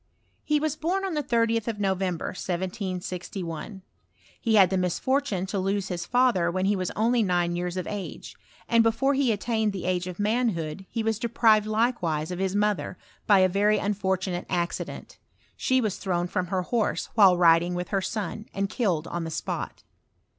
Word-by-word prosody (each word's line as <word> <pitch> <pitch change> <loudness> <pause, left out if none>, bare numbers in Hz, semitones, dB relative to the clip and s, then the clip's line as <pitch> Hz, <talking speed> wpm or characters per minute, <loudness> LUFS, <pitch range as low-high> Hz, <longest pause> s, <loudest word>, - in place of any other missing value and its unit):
He 300 -1 +2
was 310 -1 -1
bom 370 +5 -1
on 380 - -2
the 300 - 0
30th 230 -4 +1
of 220 -3 -3
November, 190 -3 -1
1761: 185 0 -5 0.6
he 225 -2 +2
had 195 -3 +6
the - - +1
misfortune 195 +3 0
jto 195 0 -2
lose 195 +1 -1
his 175 -1 -4
father 245 -9 +3
when 185 +2 -1
he 205 +1 +2
was 185 -2 -2
only 230 +2 +2
nine 175 -3 +1
years 175 0 -3
iof 185 -1 -3
age; 205 -2 -6 0.3
and 230 -1 +4
before 230 +5 +2
he 270 -3 +2
attained 220 0 0
the 190 - -5
age 180 0 0
of 180 -1 -6
manhood 205 -6 -1
he 225 -1 -2
mBS 220 -1 0
deprived 220 -2 +3
likewise 200 -9 0
of 180 - -4
his 190 0 -1
mother, 205 -3 0 0.3
by 200 -3 +6
a 185 - +6
very 205 +3 +2
un 205 +1 0
fortunate 190 -2 -2
accident: 175 -1 -3 0.4
she 260 0 +1
was 215 -6 -1
thrown 175 -3 -1
from* 180 0 -2
her 185 0 -1
horse 225 +3 -1
while 195 -5 +6
riding 170 0 +4
with 180 0 -4
her 195 -2 0
son, 215 +1 -4
and 195 0 -1
killed 180 -10 0
on 175 0 -4
the 165 - -4
spot. 160 - -4
195 Hz, 185 wpm, -26 LUFS, 180-225 Hz, 0.6 s, had